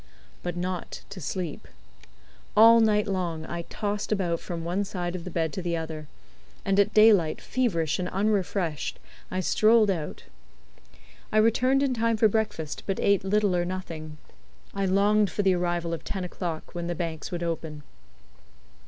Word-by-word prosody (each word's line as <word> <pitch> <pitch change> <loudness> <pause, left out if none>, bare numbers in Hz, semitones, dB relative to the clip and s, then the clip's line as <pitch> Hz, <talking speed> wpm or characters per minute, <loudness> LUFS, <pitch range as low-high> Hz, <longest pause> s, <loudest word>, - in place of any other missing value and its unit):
But 175 -1 -4
not 180 0 -4
to 195 -2 -7
sleep. 165 +1 -4 0.9
All 230 +2 +9
night 210 -2 +3
long 175 -5 -2
I 170 +1 -4
tossed 205 0 -3
about 175 -5 0
from 170 -2 -5
one 180 +4 -1
side 180 -3 -4
of 170 - -6
the - - -4
bed 165 -2 -1
to 190 - -3
the 170 -1 -1
other; 160 -2 -6 0.6
and 195 +1 +2
at 200 +1 +4
daylight, 210 -7 +5
feverish 180 - 0
and 180 0 -2
unrefreshed, 190 -5 -1 0.3
I 185 - -1
strolled 215 +3 +4
out. 160 -5 -4 1.1
I - - +1
returned 255 +5 +3
in 270 -2 +1
time 230 -1 +1
for 220 - +5
breakfast, 210 -8 -2
but 195 - -1
ate 200 -2 +3
little 205 -1 +2
or 175 - +1
nothing. 165 -4 -6 0.6
I 195 -1 0
longed 205 +2 +3
for 205 - -1
the 190 -1 +4
arrival 175 -1 -1
of 165 - -5
ten 190 -2 -4
o'clock, 175 -2 -5
when 170 -1 -4
the 175 - -2
banks 160 -3 -4
would 175 -1 -3
open. 160 -3 -4
185 Hz, 165 wpm, -27 LUFS, 170-210 Hz, 1.1 s, All